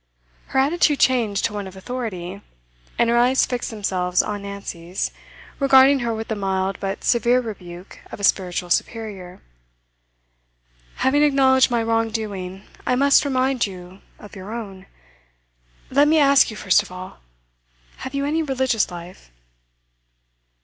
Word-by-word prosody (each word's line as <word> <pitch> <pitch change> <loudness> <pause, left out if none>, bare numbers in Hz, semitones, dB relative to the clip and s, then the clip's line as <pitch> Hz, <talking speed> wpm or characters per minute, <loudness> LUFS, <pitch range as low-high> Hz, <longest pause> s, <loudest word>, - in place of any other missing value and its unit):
Her - - -4
attitude 295 +1 +2
changed 230 -6 +2
to 220 - -2
one 205 -2 -5
of 190 - -11
authority, 200 -4 -6 0.6
and 235 - +3
her 235 +1 +2
eyes 255 +2 +3
fixed 245 -1 -3
themselves 185 -4 0
on 205 -1 -4
Nancy's, 195 -3 -5 0.5
regarding 275 0 +6
her 240 -2 -2
with 225 0 -4
the 220 - -2
mild 190 -1 -2
but 195 0 -4
severe 240 +1 +3
rebuke 185 -6 -9
of - - -8
a - - -8
spiritual 180 -3 0
superior. 195 -4 -3 1.5
'Having 280 +3 +2
acknowledged 270 -3 +4
my 235 -2 0
wrong 225 0 +1
doing, 195 -4 -5 0.2
I 250 - +1
must 280 +2 +4
remind 260 -3 +1
you 185 0 -11 0.2
of 210 - -13
your 195 +2 -9
own. 200 -5 -7 1.0
Let 285 +3 +4
me 315 +1 +4
ask 280 -2 +5
you 215 - -8
first 190 -3 +3
of - - -13
all 185 - -9 0.8
have 260 +1 -7
you 280 0 -1
any 310 +3 0
religious 260 -6 0
life? 175 - -11
220 Hz, 145 wpm, -22 LUFS, 190-260 Hz, 1.5 s, regarding